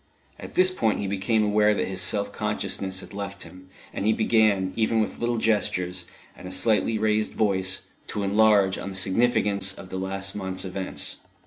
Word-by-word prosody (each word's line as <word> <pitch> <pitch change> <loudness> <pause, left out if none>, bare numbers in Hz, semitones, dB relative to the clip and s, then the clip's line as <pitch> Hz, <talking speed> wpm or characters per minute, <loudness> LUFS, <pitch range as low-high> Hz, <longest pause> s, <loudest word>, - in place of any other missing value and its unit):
At - - -10
this 185 0 +5
point 115 - +1
he 100 - -3
became 100 +3 +1
aware 105 0 +3
that - - -1
his 95 -1 -2
self 100 +3 -1
consciousness 100 -3 -2
had - - -12
left 100 0 -5
him, 95 +2 -14 0.2
and - - -3
he 110 +2 +3
began, 110 -4 +2
even 110 0 +2
with 110 - -1
little 120 0 0
gestures, 90 -5 0 0.3
and - - -10
a - - -7
slightly 110 +2 +2
raised 110 0 +1
voice, 95 -3 +1 0.3
to 105 - -3
enlarge 100 -1 +4
on 100 - -5
the 95 - -8
significance 100 -1 +1
of 95 - -11
the 95 - -4
last 95 +1 -3
month's 95 -1 -3
events. 95 0 -2
100 Hz, 185 wpm, -25 LUFS, 95-110 Hz, 0.3 s, this